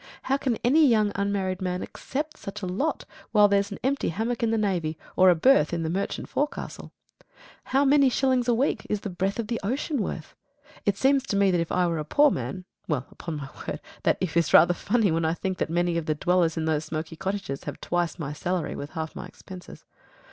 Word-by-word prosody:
How 265 Hz, -, +1 dB
can 260 Hz, -4 st, 0 dB
any 295 Hz, +7 st, +5 dB
young 215 Hz, -4 st, +3 dB
unmarried 195 Hz, -2 st, -1 dB
man 180 Hz, -1 st, -2 dB
accept 300 Hz, +3 st, -5 dB
such 205 Hz, +1 st, -8 dB
a -, -, 0 dB
lot 195 Hz, +13 st, -2 dB, 0.3 s
while 210 Hz, -1 st, +7 dB
there's 200 Hz, 0 st, +1 dB
an 200 Hz, -, -5 dB
empty 275 Hz, +2 st, 0 dB
hammock 225 Hz, +7 st, -2 dB
in 230 Hz, -, +2 dB
the 225 Hz, -, +1 dB
navy, 175 Hz, -7 st, -1 dB, 0.2 s
or 185 Hz, 0 st, +6 dB
a 180 Hz, -, +6 dB
berth 170 Hz, -, +4 dB
in 165 Hz, -1 st, -1 dB
a 160 Hz, -, -1 dB
merchant 195 Hz, +3 st, -3 dB
forecastle? 295 Hz, +1 st, -3 dB, 0.7 s
How 270 Hz, +2 st, +2 dB
many 280 Hz, -1 st, +5 dB
shillings 255 Hz, -1 st, +1 dB
a 240 Hz, -, +4 dB
week 265 Hz, +5 st, 0 dB
is 210 Hz, -1 st, -1 dB
the 205 Hz, -, -5 dB
breath 190 Hz, +3 st, -1 dB
of 230 Hz, -, -2 dB
the 230 Hz, +1 st, -2 dB
ocean 265 Hz, +5 st, -1 dB
worth? 160 Hz, -5 st, -5 dB, 0.5 s
It 200 Hz, -1 st, +2 dB
seems 275 Hz, +1 st, +3 dB
to -, -, -1 dB
me 200 Hz, -1 st, +4 dB
that 175 Hz, -2 st, +2 dB
if 165 Hz, -, -4 dB
I 180 Hz, 0 st, +2 dB
were 165 Hz, -2 st, -1 dB
a -, -, -2 dB
poor 290 Hz, -, +4 dB
man 185 Hz, -1 st, -4 dB, 0.2 s
well, 145 Hz, -5 st, -1 dB
upon 165 Hz, -3 st, -6 dB
my 140 Hz, -2 st, -7 dB, 0.2 s
word, -, -, -3 dB, 0.2 s
that -, -, +2 dB
"if" 180 Hz, -3 st, -2 dB
is 170 Hz, -3 st, +3 dB
rather 175 Hz, +1 st, +7 dB
funny 205 Hz, +2 st, +1 dB
when 165 Hz, +1 st, 0 dB
I 160 Hz, +1 st, +1 dB
think 190 Hz, 0 st, -3 dB
that -, -, -1 dB
many 170 Hz, 0 st, +1 dB
of 160 Hz, -, -7 dB
the 155 Hz, -, +1 dB
dwellers 175 Hz, 0 st, +1 dB
in 160 Hz, -, -1 dB
those 155 Hz, -1 st, 0 dB
smoky 160 Hz, +1 st, -5 dB
cottages 195 Hz, -6 st, -4 dB
have -, -, -6 dB
twice 175 Hz, -1 st, -1 dB
my 150 Hz, -4 st, -4 dB
salary 175 Hz, +3 st, -2 dB
with 145 Hz, -, -6 dB
half 160 Hz, 0 st, -4 dB
my 180 Hz, -, -6 dB
expenses. 185 Hz, 0 st, -12 dB
190 Hz, 225 wpm, -26 LUFS, 170-230 Hz, 0.7 s, while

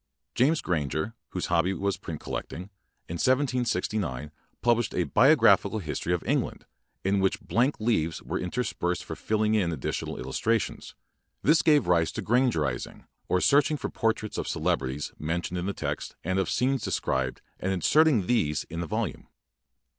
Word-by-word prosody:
James 150 Hz, +6 st, +2 dB
Gransrer, 80 Hz, -, -1 dB, 0.2 s
whose 90 Hz, -, -3 dB
hobby 90 Hz, +2 st, +1 dB
was 100 Hz, 0 st, -1 dB
print 80 Hz, -5 st, -7 dB
collecting, 90 Hz, +4 st, -6 dB, 0.4 s
in 85 Hz, -, -4 dB
1769 110 Hz, -, 0 dB, 0.3 s
published 120 Hz, -1 st, +2 dB
a -, -, +2 dB
"Biographical 110 Hz, -, +4 dB
History 75 Hz, -3 st, -3 dB
of 90 Hz, -1 st, 0 dB
England" -, -, -1 dB, 0.4 s
in 95 Hz, +1 st, +2 dB
which 95 Hz, +2 st, +1 dB
blank 120 Hz, +7 st, 0 dB
leaves 95 Hz, -8 st, 0 dB
were -, -, -4 dB
inter 90 Hz, +8 st, -2 dB
spersed 90 Hz, -6 st, -2 dB
for -, -, -6 dB
filling 110 Hz, 0 st, 0 dB
in 95 Hz, -6 st, +2 dB
additional 80 Hz, -, -3 dB
illus -, -, -4 dB
trations. 115 Hz, -1 st, -1 dB, 0.5 s
This 160 Hz, +4 st, +5 dB
gave 150 Hz, -2 st, +4 dB
rise 85 Hz, -2 st, +2 dB
to -, -, -4 dB
"granger 120 Hz, -6 st, +2 dB
izing", 65 Hz, -5 st, -4 dB, 0.2 s
or 90 Hz, -, +3 dB
searching 145 Hz, +7 st, +4 dB
for -, -, -4 dB
portraits 110 Hz, -2 st, -1 dB
of -, -, -3 dB
celebrities 65 Hz, +2 st, -1 dB
mentioned 85 Hz, +3 st, -2 dB
in 90 Hz, -, -3 dB
Uie 100 Hz, -, -2 dB
text -, -, -4 dB
and 95 Hz, +3 st, 0 dB
of 95 Hz, -, 0 dB
scenes 130 Hz, +1 st, +1 dB
described 65 Hz, -8 st, -1 dB, 0.2 s
and 95 Hz, -, -1 dB
inserting 125 Hz, -, +4 dB
these 75 Hz, -, +1 dB
in 85 Hz, -, -4 dB
the 85 Hz, -, -3 dB
volume. -, -, -3 dB
95 Hz, 160 wpm, -27 LUFS, 85-120 Hz, 0.5 s, This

